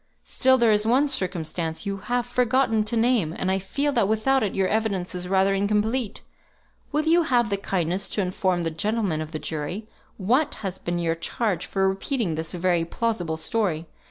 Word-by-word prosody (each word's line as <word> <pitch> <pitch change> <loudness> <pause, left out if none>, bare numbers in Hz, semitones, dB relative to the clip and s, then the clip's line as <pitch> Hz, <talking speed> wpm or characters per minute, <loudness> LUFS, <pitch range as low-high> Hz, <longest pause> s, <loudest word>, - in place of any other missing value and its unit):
Still 260 0 +3
there 235 -3 +4
is 210 0 +3
one 265 +5 +4
circumstance 175 - -2
you 200 0 -2
have 245 +4 -1
forgotten 245 -2 +2
to 230 +2 -1
name; 225 -9 +2
and 190 - 0
I 190 - +1
feel 280 +10 -1
that 230 -7 +2
without 240 +5 +2
it 205 - -1
your 190 -1 +2
evidence 200 -5 -1
is 180 0 -4
rather 190 +1 +3
incomplete. 210 +4 0 0.7
Will 305 +1 0
you 335 +2 +5
have 240 -9 +1
the 200 - +1
kindness 190 -1 -1
to 210 - -1
inform 185 -1 0
the 165 - -1
gentlemen 200 -1 -1
of 155 0 -6
the 155 - -3
jury 160 +8 -4 0.3
what 255 +10 +1
has 190 0 -3
been 175 0 -2
your 170 -1 0
charge 190 +4 -2
for 195 -1 +1
repeating 195 - -1
this 160 +1 -3
very 175 -1 +1
plausible 175 -3 -2
story? 165 -2 0
195 Hz, 185 wpm, -25 LUFS, 175-235 Hz, 0.7 s, you